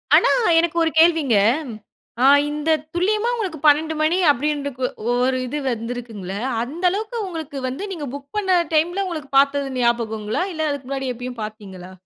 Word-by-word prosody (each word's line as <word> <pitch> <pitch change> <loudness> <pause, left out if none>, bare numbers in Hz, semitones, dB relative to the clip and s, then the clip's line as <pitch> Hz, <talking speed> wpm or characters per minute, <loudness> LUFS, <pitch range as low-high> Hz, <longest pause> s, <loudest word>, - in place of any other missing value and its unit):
ஆனா, - - +5 0.3
எனக்கு 340 0 0
ஒரு 325 - +1
கேள்விங்க? 320 -7 +4 0.9
ஆ - - +6 0.3
இந்த 300 +1 -3 0.3
துல்லியமா 420 +6 +1
உங்களுக்கு 375 -10 -4
12 310 +2 +4
மணி 315 +3 +2
அப்படின்ற 290 +1 -1 0.4
ஓ 245 - +2
ஒரு 260 0 +1
இது 295 +4 -3
வந்திருக்குங்களல்ல, 230 -5 -5 0.3
அந்த 310 +9 -8
அளவுக்க 435 +5 -4
உங்களுக்கு 320 -5 -6
வந்து 265 +9 -5
நீங்க 305 -5 -5
புக் 280 0 -11
பண்ண 380 -3 +2 0.2
டைம்ல, 350 +5 +1
உங்களுக்கு 310 -5 -6
பார்த்தது 280 0 +1
ஞாபகங்களா? 225 0 0
இல்ல 315 -1 -1
அதுக்கு 280 -3 -6
முன்னாடி 270 -2 -2
எப்பயும் 245 -1 -7
பார்த்தீங்களா? 195 -4 -9
285 Hz, 155 wpm, -21 LUFS, 245-330 Hz, 0.9 s, ஆ